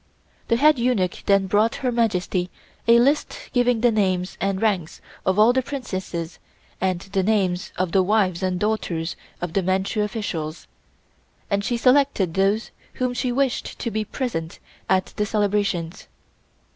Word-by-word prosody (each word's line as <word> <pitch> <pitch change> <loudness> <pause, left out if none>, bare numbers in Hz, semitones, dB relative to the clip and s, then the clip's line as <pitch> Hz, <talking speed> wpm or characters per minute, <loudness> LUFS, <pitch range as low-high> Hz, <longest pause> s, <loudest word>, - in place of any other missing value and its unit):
The 230 - +3
head 295 +2 +4
eunuch 235 -7 0
then 195 -1 +4
brought 210 +4 +2
Her 250 - +2
Majesty 185 -6 0 0.4
a 230 0 +7
list 280 +5 +2 0.2
giving 245 -2 +2
the 240 0 +4
names 185 -4 0
and 195 -1 0
ranks 195 -7 -1 0.3
of 190 +1 +2
all 220 +3 +6
the 260 - +2
Princesses 190 - -5 0.4
and 185 -2 0
the 195 0 -1
names 190 -2 0
of 185 -1 0
the 190 - +4
wives 190 -2 +1
and 185 -1 -1
daughters 180 -6 -1 0.3
of 175 -2 -4
the 195 - +2
Manchu 190 +3 0
officials, 185 -7 -4 0.9
and 200 0 +1
she 240 +4 0
selected 255 - +3
those 195 +4 +1 0.2
whom 255 -1 -1
she 245 0 -1
wished 270 0 -1
to 235 - -3
be 215 0 -1
present 195 -9 -4 0.3
at 185 0 +1
the 210 - +1
celebrations. 200 -5 -1
200 Hz, 155 wpm, -23 LUFS, 185-235 Hz, 0.9 s, a